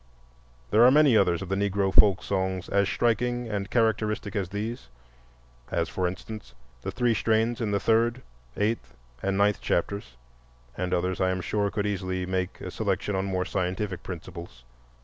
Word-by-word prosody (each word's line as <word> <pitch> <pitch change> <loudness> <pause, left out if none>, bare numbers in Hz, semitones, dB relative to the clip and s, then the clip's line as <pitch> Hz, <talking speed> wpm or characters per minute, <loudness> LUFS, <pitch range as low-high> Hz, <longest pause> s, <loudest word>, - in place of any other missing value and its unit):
There 115 - +6
are 125 - +9
many 145 -2 +5
others 90 -4 +3
of 95 - -8
the 95 - +1
Negro 100 -1 0
folk 100 -3 +6
songs 95 -1 -1
as 100 0 +2
striking 120 +1 0
and 100 -2 -3
characteristic 110 -3 0
as 95 -3 -1
these, 105 - -5 0.8
as, - - -1
for 90 -1 -1
instance, 95 - -7 0.3
the - - -4
three 120 -2 +1
strains 110 +2 +1
in 110 - 0
the 100 0 +1
third, 115 +4 +2 0.3
eighth, 105 - -1 0.2
and 95 0 0
ninth 100 0 +2
chapters; 85 -8 -2 0.6
and 90 0 -3
others 90 +1 0
I 95 - +3
am 95 0 -1
sure 100 +2 0
could 105 0 -2
easily 95 -2 -2
make 95 0 -2
a - - -5
selection 105 - -1
on 95 0 0
more 95 -1 -1
scientific 95 +1 -2
principles. 85 -7 -8
100 Hz, 170 wpm, -27 LUFS, 95-110 Hz, 0.8 s, are